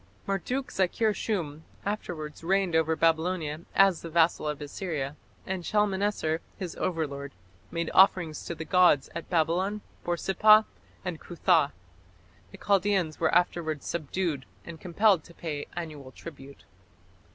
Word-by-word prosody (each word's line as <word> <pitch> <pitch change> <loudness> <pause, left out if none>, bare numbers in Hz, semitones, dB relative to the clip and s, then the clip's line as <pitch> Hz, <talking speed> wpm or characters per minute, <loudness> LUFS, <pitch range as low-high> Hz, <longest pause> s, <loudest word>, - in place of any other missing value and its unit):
Marduk 245 +8 -2
zakir 210 +4 +1
shum 160 -8 -3 0.2
afterwards 165 -7 -4
reigned 190 -1 +1
over 160 0 +3
Babylonia 160 -1 +1
as 195 -3 +5
the 165 - -7
vassal 165 -1 +2
of 150 -1 -2
Assyria, 145 -2 -4 0.3
and 190 -2 -3
Shalmaneser, 200 -5 0 0.2
his 180 -3 -5
overlord, 145 -5 -3 0.4
made 170 -1 -3
offerings 180 -5 +4
to 170 - -4
the 160 - -6
gods 180 -7 +4
at 170 - -6
Babylon, 180 +5 +1 0.2
Borsippa, 215 +5 +5 0.4
and 175 -4 -3
Cuthah. 170 -4 +2 0.8
The - - -11
Chaldæans 195 -5 +1
were 160 - +2
afterwards 165 -4 +1
subdued, 160 -2 -2 0.2
and 165 -2 -9
compelled 185 -1 +3
to 170 - -15
pay 150 -4 -5
annual 150 -6 -6
tribute. 140 -2 -12
170 Hz, 130 wpm, -28 LUFS, 155-190 Hz, 0.8 s, as